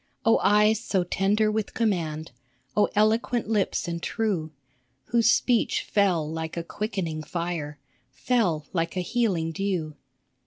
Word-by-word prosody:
Oh 225 - +5
eyes 210 +2 +4
so 190 -5 +1
tender 205 +4 +1
with 215 -1 -3
command! 165 - -1 0.4
Oh 210 - +3
eloquent 220 +3 +2
lips 210 -4 0
and 170 0 -3
true, 195 -9 -1 0.6
Whose 235 -1 +4
speech 245 -1 +2
fell 185 -7 +1
like 160 +1 -5
a 170 - -2
quickening 180 -5 -3
fire, 165 -2 -4 0.3
Fell 185 -12 0
like 165 0 -1
a - - +1
healing 180 -5 0
dew 170 -4 -2
190 Hz, 130 wpm, -26 LUFS, 165-215 Hz, 0.6 s, Oh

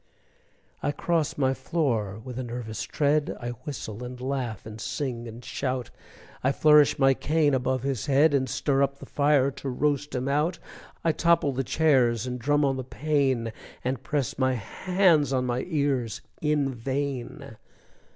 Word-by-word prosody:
I - - 0
cross 165 0 -1
my 135 -2 +2
floor 125 - -1
with 125 -1 -6
a - - -2
nervous 115 -3 -5
tread, 150 0 0
I 120 - -4
whistle 120 -2 -6
and 125 0 -7
laugh 125 -5 -3
and 110 0 -8
sing 120 -4 -3
and 115 +2 -10
shout, 130 -2 -3 0.5
I 130 - +3
flourish 150 0 +5
my 135 -1 +5
cane 150 +1 +1
above 130 -1 0
his 135 -1 -2
head, 145 +2 +4
And 130 -2 +1
stir 140 -2 +1
up 140 0 +1
the - - -10
fire 140 -2 +2
to 135 - -6
roast 145 +2 0
him 125 +1 -1
out; 150 +5 +1 0.5
I 165 - +3
topple 165 -2 +3
the 135 0 -1
chairs, 130 -6 +2
and 125 0 -4
drum 145 +4 +2
on 135 -1 +1
the 130 - -3
pane, 130 -4 0 0.3
And 130 -1 -2
press 140 -4 -2
my 130 -1 +3
hands 165 - +2
on 130 -1 +1
my 125 0 -1
ears, 140 - -1 0.2
in 150 -3 +1
vain! 130 +1 -4
135 Hz, 165 wpm, -26 LUFS, 125-145 Hz, 0.5 s, flourish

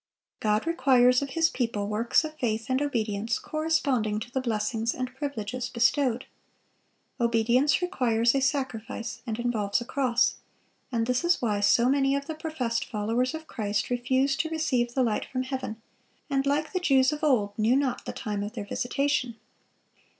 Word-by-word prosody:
God 215 +2 +1
requires 255 -6 +4
of 280 - -3
His 330 0 +5
people 230 -5 -2
works 220 +8 +2
of 310 0 -6
faith 225 0 -1
and 260 +2 +2
obedience 225 -5 -1
corresponding 280 -9 0
to 235 - -7
the 265 - -1
blessings 225 -1 -1
and 255 0 -4
privileges 255 -4 -4
bestowed. 250 +1 +1 0.9
Obedience 235 +7 +2
requires 235 -10 +2
a 275 - +1
sacrifice 250 -4 -2
and 220 -1 -2
involves 230 -3 0
a 240 - -6
cross; 250 -3 +1 0.5
and 230 -2 0
this 250 +5 0
is 345 +1 +3
why 210 -4 0
so 235 +4 +4
many 270 0 +3
of 280 0 -2
the 320 - -4
professed 305 -8 -2
followers 235 +5 -1
of 315 0 -7
Christ 210 -4 -2
refused 260 +3 +1
to 320 +2 0
receive 255 -7 0
the 260 - +3
light 225 -3 0
from 255 -1 -3
heaven, 255 -4 -5 0.5
and, 275 0 +1
like 300 +4 0
the 370 - +1
Jews 270 -4 +3
of 300 +1 -6
old, 240 -9 +2
knew 220 +4 +3
not 265 -3 0
the - - -3
time 210 -2 -4
of 205 +1 -5
their 215 -4 -5
visitation. 255 +2 -1
250 Hz, 170 wpm, -27 LUFS, 225-280 Hz, 0.9 s, His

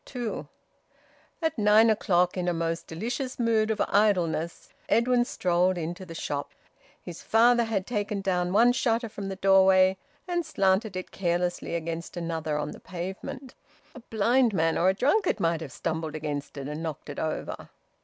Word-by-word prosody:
TWO. 245 -4 -5 1.0
At 320 -5 0
nine 215 +2 +6
o'clock, 180 -4 +2
in 180 -1 -2
a 175 - +1
most 165 0 -2
delicious 240 +10 -4
mood 225 -3 +2
of 220 - -1
idleness, 180 -5 +1 0.2
Edwin 240 +1 +3
strolled 180 -3 +1
into 175 +3 -5
the 165 - -9
shop. 145 -2 -4 0.5
His 175 -2 -8
father 235 +1 +4
had 205 -4 -2
taken 210 -3 -2
down 180 -2 0
one 230 +5 +5
shutter 230 -1 0
from 200 -2 -6
the 195 - -4
doorway, 190 0 +5 0.3
and 350 -1 0
slanted 195 - +1
it 185 - -5
carelessly 175 -1 -1
against 165 +1 -5
another 165 -3 -2
on 150 0 -3
the - - -10
pavement. 190 +8 -7 0.4
A - - -10
blind 230 +1 +2
man 165 -1 +2
or 180 - +3
a 190 - +1
drunkard 315 - +2
might 165 -1 0
have 150 -5 -7
stumbled 160 -1 -3
against 145 -2 -5
it 140 -1 -5
and 150 +2 -5
knocked 160 -3 -5
it 145 - -6
over. 160 -1 -4
190 Hz, 165 wpm, -27 LUFS, 165-225 Hz, 1.0 s, nine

